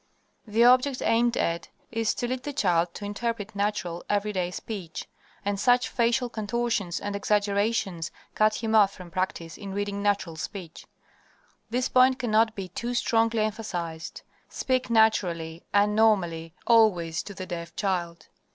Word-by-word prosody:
The 220 +2 +3
object 255 +2 +4
aimed 235 +1 +3
at 170 0 -1 0.2
is 225 -2 0
to 245 - -2
lead 255 +1 -2
the 290 +2 -5
child 175 - +2
to 205 - -6
interpret 215 0 -3
natural, 200 -4 -2
everyday 205 -3 0
speech, 180 -2 -6 0.4
and 200 -1 -1
such 245 +3 +3
facial 240 +1 +1
contortions 225 -5 -2
and 205 0 -4
exaggerations 200 -3 0 0.2
cut 215 0 +3
him 220 0 0
off 205 -3 +5
from 180 -3 -11
practice 175 -3 -3
in 195 -2 -6
reading 200 0 -2
natural 200 -5 0
speech. 170 -1 -7 0.8
This 250 +2 0
point 255 0 +5
cannot 225 -3 +2
be 190 -2 -5
too 235 +7 -4
strongly 230 -2 +2
emphasized. 175 -7 -4 0.3
Speak 255 -1 -1
naturally 175 -8 +2
and 205 +1 +3
normally 175 -7 +2
always 180 -8 +4
to 200 - -9
the 185 - -6
deaf 170 -2 -6
child. 175 -4 -2
205 Hz, 145 wpm, -27 LUFS, 180-230 Hz, 0.8 s, off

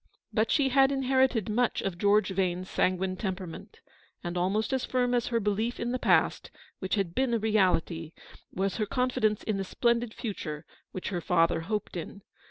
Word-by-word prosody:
But 220 +1 +2
she 280 -3 +3
had 270 +1 +4
inherited 260 -5 +2
much 235 +3 +1
of 185 -3 -3
George 205 +1 +3
Vane's 185 -1 -1
sanguine 185 0 0
temperament, 185 -4 -6 0.4
and 175 0 -4
almost 195 +7 0
as 265 - 0
firm 250 -1 0
as 240 -1 +1
her 235 -1 +1
belief 215 +3 -1
in 235 +1 -2
the 255 - -1
past, - - +2 0.3
which 190 +2 -1
had 195 -5 -1
been 255 +2 +1
a - - +3
reality, 185 -7 +1 0.4
was 190 0 -1
her 215 -2 -1
confidence 220 -3 0
in 215 -2 -1
the 195 - -1
splendid 235 +3 0
future, 185 - -5 0.3
which 185 - -4
her 180 -4 -3
father 165 -1 +2
hoped 210 +4 -3
in. 180 +3 -7
210 Hz, 180 wpm, -29 LUFS, 185-240 Hz, 0.4 s, had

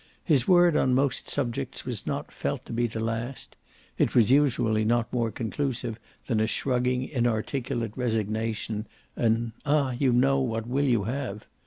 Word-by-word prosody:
His 140 -7 +2
word 175 -3 +5
on 130 -1 +3
most 135 0 0
subjects 120 - -3
was - - -5
not - - -3
felt - - -3
to - - -7
be 120 +1 +1
the 115 0 -5
last 115 +3 -4 0.4
(it - - +2
was 115 -1 +5
usually 120 -6 +3
not 115 +2 +1
more 120 -2 +1
conclusive 120 +1 -3 0.3
than 115 -4 0
a 110 - +2
shrugging 125 0 0
inarticulate 120 -1 -1
resignation, 110 -2 -2 0.3
an 115 0 +1
"Ah 145 -2 +2
you 130 +1 +2
know, 135 +3 +3
what 115 -4 -1
will 135 +4 +1
you 120 -5 +2
have?") 115 -2 -4
120 Hz, 160 wpm, -27 LUFS, 115-130 Hz, 0.4 s, word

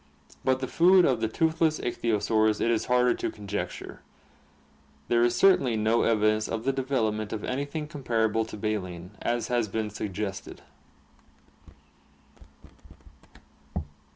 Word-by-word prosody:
But 130 0 +1
the 130 - -2
food 180 +4 +5
of 125 -4 +1
the 110 - +1
tooth 160 +8 -1
less 155 -2 +3
ichthyosaurs 110 -2 +1
it 115 - +1
is 115 - 0
harder 125 0 +3
to - - -3
conjecture; 105 -2 -6 1.1
there 120 0 +3
is 120 0 +3
certainly 140 -12 +4
no 110 +2 +2
evidence 110 -1 +2
of 115 0 -3
the 135 +2 +1
development 110 -6 -1
of 110 -2 -4
anything 145 +4 -3
comparable 115 -7 0
to 110 - -9
baleen, 90 -4 -4
as 120 -1 -1
has 120 -3 +1
been 105 +1 -3
suggested. 100 -1 -5
115 Hz, 125 wpm, -27 LUFS, 110-130 Hz, 1.1 s, food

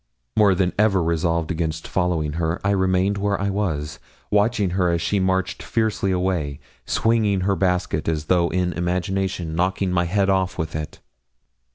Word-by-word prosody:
More 100 -3 +5
than 90 0 +1
ever 100 -4 +3
resolved 85 0 0
against 80 -1 -3
following 85 -5 0
her, 80 +1 -1
I 100 - +2
remained 95 +1 +1
where 100 0 0
I 100 0 0
was, 80 -7 -2 0.3
watching 105 -2 +2
her 90 -1 +1
as 85 0 +1
she 100 +5 0
marched 95 -1 0
fiercely 110 -3 0
away, 90 -6 -1 0.3
swinging 110 -4 +2
her 100 +1 +1
basket 90 -2 0
as 80 -2 -1
though 85 0 +2
in 90 -1 0
imagination 90 -1 -2
knocking 95 +2 0
my 85 -1 +1
head 100 +3 +1
off 95 -2 +1
with 80 -1 -3
it. 75 0 -6
90 Hz, 165 wpm, -22 LUFS, 85-100 Hz, 0.3 s, More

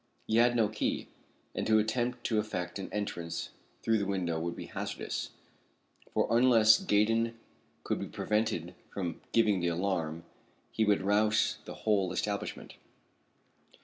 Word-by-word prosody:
He 110 - +1
had 120 +1 +5
no 115 -3 +4
key, 105 0 -2 0.4
and - - -2
to 110 0 +5
attempt 120 +3 0
to 110 -2 +1
effect 95 -3 -3
an 95 - -6
entrance 85 -5 -3 0.3
through 115 -1 +3
the 100 - -1
window 90 -4 -1
would 85 +1 -3
be - - -7
hazardous, - - -4 0.8
for, - - +1
unless 115 - +6
Gaydon 115 - +2 0.5
could - - -1
be - - -4
prevented 105 -6 -1 0.2
from 90 -4 -4
giving 110 -4 +3
the 90 - 0
alarm, 85 -2 -1 0.5
he 110 - +1
would 105 -2 +2
rouse 105 +2 +2
the - - -7
whole 100 -4 +2
establishment. - - -3
105 Hz, 145 wpm, -31 LUFS, 90-110 Hz, 0.8 s, unless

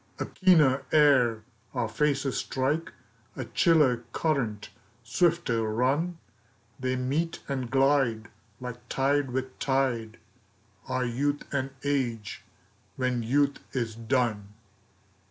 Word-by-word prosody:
A - - -2
keener 155 -8 +4
air 130 -7 +4 0.3
our 115 - 0
faces 135 +1 0
strike, 140 +5 -1 0.4
A - - -4
chiller 155 -8 +3 0.2
current 125 -10 -1 0.3
swifter 160 -1 +1
run; 135 +10 0 0.6
They 130 0 -1
meet 145 +7 -2
and 130 -3 -3
glide 135 -4 +2 0.3
like 125 -1 -6
tide 140 0 +1
with 130 +1 -4
tide, 130 -5 0 0.7
Our 130 0 -1
youth 140 +5 -1
and 135 -1 -1
age, 120 -7 -2 0.5
when 125 -2 0
youth 140 +5 +1
is 120 -4 -2
done. 115 -3 -1
130 Hz, 105 wpm, -28 LUFS, 120-145 Hz, 0.7 s, keener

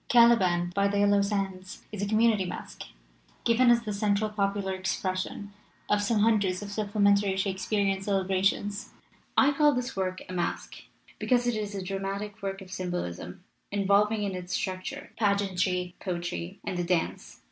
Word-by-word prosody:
Caliban 190 -8 +5
by 200 +1 +2
the 200 0 -1
Yellow 205 0 +4
Sands 195 -2 -3
is 210 -2 -5
a 200 - 0
com 215 +1 +1
munity 220 -5 +3
masque, - - -7 0.6
given 240 +2 +4
as 235 -1 +5
the 210 -2 -3
central 205 +1 +1
popular 200 -2 -1
expression 185 +1 -3 0.4
of 210 0 +3
some 210 +1 +1
hundreds 205 -4 +2
of 200 - -7
supplementary 200 -2 +2
Shakespearian 195 0 0
celebrations. 195 +1 0 0.4
"I 280 - +6
call 295 0 +4
this 245 0 -3
work 185 -1 -2
a 185 - -7
masque, 175 -1 -3 0.3
because 245 -1 +2
it 240 -2 +1
is 210 -1 -3
a 195 - -3
dramatic 195 +3 -4
work 195 0 -4
of 185 - -14
symbolism, 180 - -4 0.3
involving 205 +2 +2
in 200 -1 -2
its 180 0 -4
structure 185 -1 -4
pageantry, 190 -3 +1
poetry, 175 0 -4
and 180 - -3
the - - +1
dance. 170 -1 -2
200 Hz, 160 wpm, -28 LUFS, 185-210 Hz, 0.6 s, I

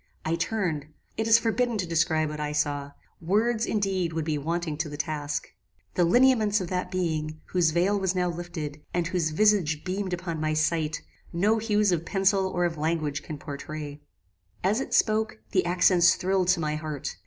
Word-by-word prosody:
"I 160 - 0
turned: 170 -5 -2 0.3
It 220 - -1
is 225 0 +7
forbidden 230 +1 0
to 185 - -1
describe 160 -2 +1
what 150 0 -6
I 150 0 -2
saw: 145 -1 -1 0.3
Words, 220 +6 +1
indeed, 190 -5 0
would 160 -1 -2
be 155 -1 0
wanting 165 +1 -2
to 160 -1 -2
the 145 - -7
task. 150 -1 -3 0.4
The 180 - +2
lineaments 220 0 +4
of 180 -3 -4
that 180 -1 -2
being, 155 -4 -2
whose 175 -3 +3
veil 180 +5 +2
was 190 -1 0
now 180 -1 +1
lifted, 165 -4 -5
and 175 -1 +1
whose 170 -2 0
visage 165 -4 +2
beamed 190 +1 -3
upon 170 -3 -3
my 155 0 0
sight, 155 0 0 0.3
no 210 +6 +2
hues 210 -2 +2
of 170 -2 0
pencil 195 +1 +2
or 175 -1 0
of 165 -2 -2
language 155 -2 -1
can 155 0 -7
pourtray. 145 0 -7 0.6
"As 205 +6 +2
it - - -2
spoke, 215 - +2
the - - +3
accents 175 0 +5
thrilled 185 0 0
to 180 -1 +3
my 150 -1 -1
heart. 155 -3 -5
175 Hz, 185 wpm, -27 LUFS, 155-195 Hz, 0.6 s, is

